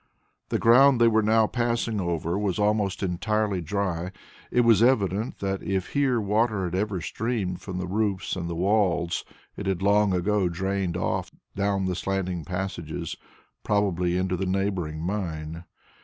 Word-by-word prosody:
The - - +1
ground 125 +3 +6
they 115 - +6
were 110 -1 +4
now 110 +1 +4
passing 115 -2 -1
over 85 -1 -1
was 100 -3 -1
almost 105 -2 +1
entirely 95 +2 0
dry. 90 0 -2 0.4
It 125 - +3
was 115 -3 +5
evident 110 -3 +2
that 95 -1 -2
if 95 -2 -2
here 135 -4 +1
water 105 0 +1
had 90 -1 -3
ever 95 -1 -1
streamed 105 -3 -2
from 95 -2 -6
the 90 - -2
roofs 100 0 -1
and 85 -2 -4
the 85 - -3
walls, 90 -2 +1 0.3
it 100 - -5
had 95 -1 -1
long 100 0 +4
ago 95 +1 +1
drained 95 0 -2
off - - -1 0.3
down 100 -1 0
the 90 - 0
slanting 90 -2 -2
passages, 90 -3 -4 0.5
probably 90 -4 +1
into 95 0 0
the 95 +1 -2
neighbouring 90 -5 -1
mine. 85 -4 -4
95 Hz, 155 wpm, -26 LUFS, 90-105 Hz, 0.5 s, ground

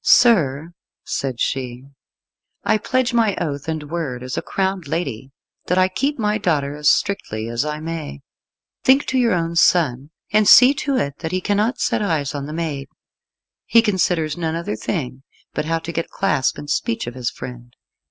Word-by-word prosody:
"Sir," 165 - +4 0.3
said 130 -4 -3
she, 125 -1 -2 0.8
"I 215 - +2
pledge 255 +2 0
my 225 -4 +2
oath 145 -3 -4
and 160 -1 -2
word 140 -8 -3
as 130 0 -4
a - - -1
crowned 190 -4 -2
lady 135 -6 -3 0.4
that 180 - +1
I 185 0 +4
keep 280 +10 -1
my 210 -2 0
daughter 145 -7 0
as 150 0 +4
strictly 115 - -1
as 120 +3 -1
I 150 0 -3
may. 155 - -6 0.6
Think 270 +2 +5
to 260 - 0
your 235 -4 +3
own 170 -1 -1
son, 145 -6 +3 0.2
and 210 -1 +4
see 255 +2 +9
to 280 -1 -1
it 140 - -2
that 160 -1 -4
he 185 - 0
cannot 210 +6 0
set - - 0
eyes 160 -8 -1
on 140 -1 -4
the - - -6
maid. 155 -4 -3 0.8
He 230 -1 +5
considers 175 -7 +1
none 165 -2 -2
other 165 -10 -3
thing 130 - -4 0.3
but - - -2
how 165 +1 0
to 165 +1 -6
get 165 0 -3
clasp 150 -9 0
and 145 - -8
speech 230 +10 -1
of 120 - -6
his 125 -2 -2
friend." 120 -1 -10
165 Hz, 180 wpm, -21 LUFS, 140-200 Hz, 0.8 s, see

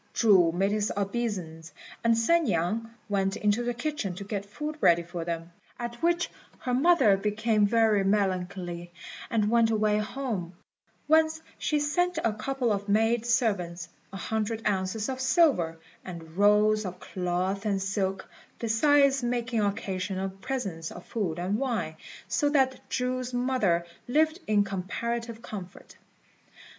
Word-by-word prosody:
Chu 190 -7 +5
made 195 +4 +1
his 210 0 0
obeisance, 195 -6 -3 0.3
and 230 -1 +4
San 330 +9 +3
niang 210 +4 0 0.2
went 195 -1 0
into 210 +2 +1
the 240 0 -2
kitchen 245 - -3
to 200 - -6
get 200 0 -4
food 300 +8 -5
ready 170 0 +5
for 175 0 -5
them, 165 0 -4 0.3
at 240 0 -6
which 345 +1 +1 0.3
her 250 - -3
mother 265 - +5
became 210 +1 +1
very 220 -2 +3
melancholy, 185 -3 -1 0.4
and 215 -2 +1
went 230 -1 +4
away 215 -1 +2
home, 215 -6 -3 0.5
whence 315 +1 +3 0.2
she 300 - +1
sent 355 +4 +1
a 225 - +2
couple 250 +2 -1
of 200 0 -2
maid 225 +3 +2
servants, 200 -9 0 0.2
a 195 - -6
hundred 220 +2 -2
ounces 200 +2 -1
of 260 -1 -3
silver, 260 - +3 0.3
and 165 -3 -9
rolls 210 +2 +4
of 185 -2 -6
cloth 185 +2 -2
and 200 -3 0
silk, 195 -1 -2 0.3
besides 275 +4 +3
making 240 -1 -1
occasional 195 -1 -2
presents 190 -5 -4
of - - -10
food 185 -8 -2
and 190 +5 -1
wine, 225 -12 -2 0.3
so 290 - +1
that 265 -3 +1
Chu's 250 0 -2
mother 245 -9 +1 0.2
lived 315 +6 +2
in 210 -1 +4
comparative 230 +4 -4
comfort. 190 -4 -9
210 Hz, 140 wpm, -28 LUFS, 190-245 Hz, 0.5 s, Chu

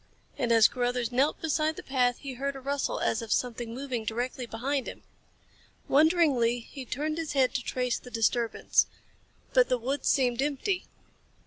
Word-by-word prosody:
And 240 -3 -1
as 225 -1 +7
Carruthers 245 -1 -1
knelt 270 +5 +2
beside 315 0 0
the - - -8
path 250 -2 +1
he 275 -2 -7
heard 275 +2 -3
a - - -6
rustle 280 +1 -2
as 220 - 0
of 225 -2 -7
something 240 -2 -1
moving 250 -2 -4
directly 245 +3 -3
behind 260 +4 -2
him. - - -8 0.8
Wonderingly, 280 -7 +3
he 260 +3 -9
turned 305 +5 -2
his 320 -2 -3
head 265 -2 +3
to 250 - -1
trace 250 -1 -1
the 250 - -12
disturbance. 230 0 +1 0.7
But - - +5
the 250 - +2
woods 260 +4 -2
seemed 250 -2 +2
empty. 295 +7 -1
255 Hz, 165 wpm, -28 LUFS, 240-280 Hz, 0.8 s, as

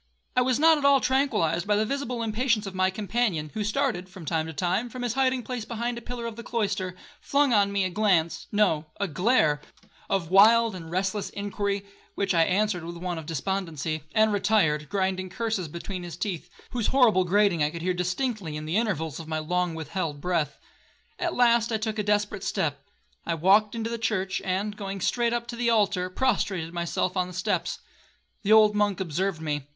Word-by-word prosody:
I 250 - +4
was 250 -1 +2
not 320 0 +5
at - - -6
all 280 -1 +6
tranquillized 215 - +1
by 210 - +3
the 215 +1 +2
visible 250 -2 -3
impatience 225 0 0
of 195 - -6
my 185 0 +2
companion, 190 -5 -1
who 215 - -2
started, 215 -5 -1
from 185 -3 -11
time 160 0 -1
to - - -5
time, 185 +9 -1
from 250 +1 -6
his 240 -2 -1
hiding 260 -1 +1
place 250 -2 -4
behind 235 +2 -3
a 235 - -7
pillar 240 0 -6
of 230 -1 -5
the - - -6
cloister, 195 -6 -2 0.3
flung 280 -2 +2
on 200 -2 +3
me 200 -1 +1
a 185 - -1
glance—no, 175 -3 +1
a 200 - 0
glare—of 170 - -1
wild 225 +3 +6
and 165 -3 -8
restless 190 +3 -1
inquiry, 200 0 -3 0.3
(which 195 -2 0
I 165 - +4
answered 190 -1 0
with 170 +1 -7
one 175 -1 -3
of 155 - -10
despondency), 165 -2 -2
and 220 -1 +4
retired, 175 -8 +2
grinding 190 -1 -1
curses 220 -3 -2
between 175 +4 -6
his 170 -2 -7
teeth, 175 -3 -4 0.2
whose 240 -4 -1
horrible 235 -8 +4
grating 190 -2 +2
I 150 - +3
could 165 +1 -7
hear 185 +1 +1
distinctly 180 - -2
in 150 - -6
the 160 +6 0
intervals 160 - -1
of 160 - -8
my 160 0 -2
long 175 +2 -1
withheld 160 -1 -4
breath. 165 -3 -1 0.6
At - - -1
last 235 -1 +4
I 220 - +1
took 220 0 -3
a - - +3
desperate 205 -1 0
step. 145 -6 -2 0.4
I 170 - -1
walked 200 +6 +4
into 230 0 -3
the 235 - -3
church, 195 -4 -1
and, 195 +3 -1
going 195 -1 -5
straight 235 +5 +1
up 240 0 -1
to 240 - -4
the 235 0 0
altar, 200 -5 +2
prostrated 190 -7 0
myself 175 +1 -1
on 180 -1 0
the 180 - -10
steps. - - -1 0.6
The 210 - 0
old 215 -1 +7
monk 205 -2 +1
observed 185 0 -1
me. 145 -3 -3
195 Hz, 200 wpm, -26 LUFS, 175-225 Hz, 0.6 s, old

